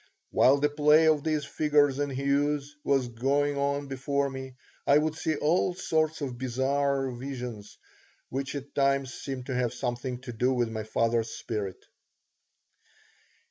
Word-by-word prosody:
While 135 +2 +5
the 145 +1 +3
play 150 +2 +5
of 155 -2 +3
these 155 -2 0
figures 145 -2 +2
and 145 -1 -1
hues 140 +2 0
was 135 -3 +2
going 140 +5 0
on 140 0 0
before 140 +1 -1
me 130 -1 -7 0.3
I 140 - +6
would 155 +1 +1
see 160 0 -1
all 170 +4 +1
sorts 160 -2 0
of 125 -4 -4
bizarre 135 +1 0
visions, 120 -4 -7 0.5
which 135 +2 -3
at 140 0 -7
times 135 -1 +1
seemed 135 -2 -6
to 130 - -4
have 125 -1 0
something 120 +1 -3
to 130 -2 -7
do 125 +3 +1
with 120 -2 +1
my 110 -1 -4
father's 115 +1 +1
spirit. 100 -6 -5
140 Hz, 150 wpm, -28 LUFS, 125-145 Hz, 0.5 s, I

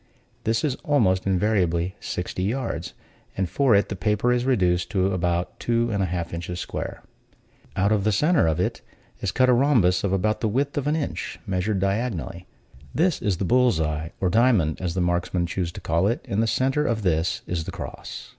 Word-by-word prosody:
This 115 +1 +1
is 145 - +1
almost 100 -11 +1
invariably 95 -2 +1
sixty 90 +1 -4
yards, 105 -4 -2 0.4
and 95 -1 0
for 130 +4 +3
it 100 - +3
the 100 - -3
paper 105 +5 +1
is 125 0 0
reduced 90 -9 +2
to 95 -2 +1
about 90 -1 -1
two 115 0 +1
and 100 -2 0
a 95 - +1
half 85 -1 -3
inches 85 +1 -4
square. - - -5 0.7
Out 100 +2 +2
of 105 -2 +2
the 110 - +2
center 150 - +3
of 80 +1 0
it 90 - -1 0.4
is 95 - -1
cut 130 -1 +3
a 125 - +5
rhombus 120 -9 +3
of 100 - 0
about 105 +3 0
the 110 - +1
width 140 +7 0
of 145 -1 -1
an 150 - +2
inch, 155 -3 -4
measured 95 +1 -1
diagonally; 95 -4 -2 0.5
this 170 0 +2
is 100 -6 0
the 95 - -2
bull's 125 -4 +3
eye, 75 +1 -2
or 90 -2 +1
diamond, 110 - +3
as 90 -2 -2
the 95 - +1
marksmen 90 0 0
choose 85 0 -2
to - - -8
call 85 +4 +1
it; 115 - -2
in 100 - -1
the 115 - +2
center 135 +5 +1
of 110 -3 -1
this 85 -1 0
is 85 -2 -3
the - - -5
cross. - - -8
100 Hz, 200 wpm, -24 LUFS, 90-120 Hz, 0.7 s, a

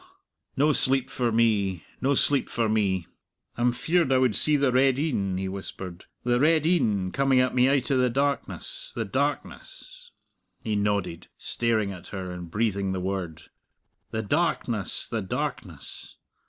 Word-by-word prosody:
No 150 +3 +4
sleep 135 -1 +1
for 120 -2 0
me 105 -6 +2 0.2
no 140 +2 +2
sleep 140 +1 +2
for 115 -1 0
me! 100 -5 +1 0.5
I'm 120 +1 +2
feared 160 +4 +1
I 130 - +5
would 130 -3 +3
see 150 +8 +3
the 140 -2 +2
red 130 +1 +3
een," 100 - -1
he 95 0 -2
whispered, 95 -2 -7 0.2
"the 120 0 +2
red 155 +2 +3
een, 110 - +2
coming 135 +1 +3
at 130 0 +2
me 125 +1 +4
out 140 0 +1
o' 135 - +3
the 125 0 +3
darkness, 140 +3 -2
the 115 - -2
darkness" 485 - -4 0.5
he 110 -2 -1
nodded, 100 -4 -1
staring 110 -4 0
at 90 -3 -10
her 95 -2 -5
and 90 -1 -7
breathing 100 -2 0
the 95 - -2
word 90 -4 -4 0.7
"the 110 0 -3
darkness, 120 - -1
the - - -2
darkness! - - -5
115 Hz, 155 wpm, -26 LUFS, 100-135 Hz, 0.7 s, I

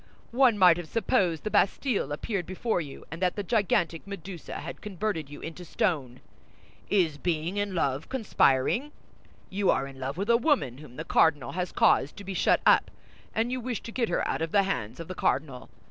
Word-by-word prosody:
One 245 -2 +4
might 180 -3 +7
have 175 -2 -6
supposed 180 -5 +1
the 215 - -3
Bastille 200 - +1
appeared 180 +4 -3
before 185 +1 -1
you, 145 -4 -9
and 165 +3 -7
that 180 -1 +1
the 205 - -3
gigantic 180 -5 0
Medusa 190 -3 -7
had - - -7
converted 190 -6 -3
you 145 - -10
into 165 +2 -7
stone. 145 - -1 0.7
Is 165 -7 +2
being 170 +3 -1
in 205 -2 -1
love 140 -2 -1
conspiring? 240 - +2 0.6
You 195 0 +1
are 135 - +2
in 135 -1 -10
love 135 +4 -4
with 200 +5 +1
a 235 - +6
woman 235 - +1
whom 140 -5 -13
the 160 - -6
cardinal 145 -6 +3
has 180 0 -3
caused 145 - +3
to 200 - -8
be 195 0 -5
shut - - +3
up, - - +5 0.5
and 230 +2 +1
you 255 0 -2
wish 245 -2 -3
to 230 - -7
get 235 -1 -1
her 175 - 0
out - - -2
of 165 0 -2
the 200 -1 +4
hands 140 - -3
of 165 - -7
the 185 - -5
cardinal. 135 -6 -1
180 Hz, 200 wpm, -28 LUFS, 155-205 Hz, 0.7 s, might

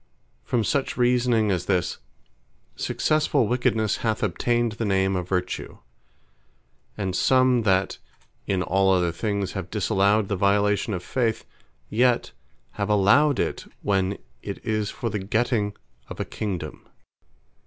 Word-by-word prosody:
From 115 - 0
such 140 +5 -1
reasoning 120 -3 +2
as 90 -1 -2
this, 90 -3 0 0.8
Succesfull 150 -5 +1
wickednesse 115 -3 +1
hath 110 -2 -1
obtained 120 +4 +1
the 115 +2 -4
Name 95 -2 +1
of 90 -1 -3
Vertue; 90 -1 -3 1.2
and 95 -3 -2
some 130 0 +4
that 95 +1 +1 0.5
in 95 -2 0
all 95 +3 +2
other 90 -2 +2
things 100 +1 -2
have 95 -3 -5
disallowed 100 0 +2
the 100 - -1
violation 100 +2 +2
of 90 - -5
Faith; 115 -1 -1 0.4
yet 120 - +2 0.5
have 100 - 0
allowed 115 +8 +4
it, - - -3
when 95 -1 +1 0.2
it - - -5
is 110 -1 0
for 115 - -4
the 105 - -2
getting 105 +1 0 0.3
of - - -8
a - - -1
Kingdome. 90 -8 -5
105 Hz, 130 wpm, -24 LUFS, 95-120 Hz, 1.2 s, some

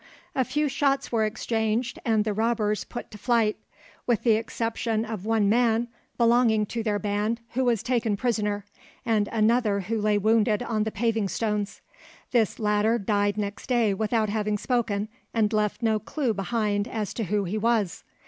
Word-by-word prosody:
A 260 - +3
few 295 +4 0
shots 275 0 0
were 225 -2 +2
exchanged 225 +1 -1
and 220 -3 +2
the 215 - 0
robbers 215 -2 0
put 240 - -8
to 210 - -10
flight, 225 -1 +2 0.5
with 235 -4 +1
the 235 - +4
exception 225 0 -1
of 215 -2 -6
one 220 -2 +2
man 235 +1 +2 0.3
belonging 235 -2 +4
to 235 - -1
their 210 -2 0
band 210 +2 -1
who 260 +2 0
was 230 -3 +1
taken 230 -4 0
prisoner, 210 -3 -1 0.4
and 215 -3 +2
another 220 -2 +2
who 215 +3 -2
lay 210 0 +2
wounded 220 +2 +2
on 220 -3 -1
the 220 - -2
paving 220 -1 0
stones. 210 -1 -2 0.5
This 230 -5 +2
latter 210 +1 +2
died 205 -1 0
next 205 0 -4
day 235 -5 +2
without 215 +1 0
having 210 0 0
spoken, 215 -3 -1 0.3
and 220 -1 +2
left 215 +2 0
no 220 -1 +2
clue 245 +3 -1
behind 205 +1 -1
as 215 -5 -3
to 225 - -2
who 205 +2 0
he 200 +4 -2
was. 220 -5 0
220 Hz, 170 wpm, -26 LUFS, 210-235 Hz, 0.5 s, the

